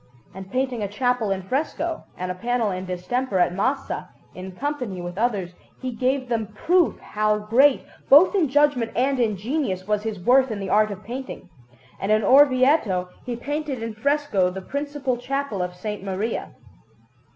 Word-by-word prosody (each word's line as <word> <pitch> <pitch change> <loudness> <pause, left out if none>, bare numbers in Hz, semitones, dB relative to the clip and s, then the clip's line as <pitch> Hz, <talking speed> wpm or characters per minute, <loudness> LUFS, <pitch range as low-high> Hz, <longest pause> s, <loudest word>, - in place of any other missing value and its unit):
And 190 0 -10
painting 255 -2 -1
a 205 - -1
chapel 245 +1 0
in 195 -1 -1
fresco 315 - -2
and 180 0 -3
a - - -2
panel 235 +2 -1
in 185 0 -4
distemper 195 +5 -2
at 175 -1 +3
Massa, 260 +9 -2 0.2
in 185 +1 -8
company 250 -5 -3
with 175 0 -6
others, 200 -5 -1 0.3
he 255 - -4
gave 255 +2 0
them 225 -3 -1
proof 335 - +1
how 215 0 0
great, 245 +7 +3 0.3
both 300 +9 +8
in 355 -8 +2
judgment 285 -5 +2
and 265 +2 +1
in 215 -4 +1
genius, 205 -4 -2
was 210 -1 +1
his 215 -2 -4
worth 255 +7 +4
in 215 -2 -4
the 195 -1 -4
art 215 0 +4
of 200 0 -7
painting; 250 -6 -7 0.5
and 195 - -1
in 215 0 +3
Orvieto 255 - +4 0.2
he 245 - -2
painted 285 0 -4
in 230 -1 -4
fresco 230 -5 +1
the 185 +1 -6
principal 280 0 -3
Chapel 275 -5 -3
of 180 - -1 0.2
S. 210 -2 -3
Maria. 195 +4 -3
230 Hz, 175 wpm, -23 LUFS, 195-270 Hz, 0.5 s, both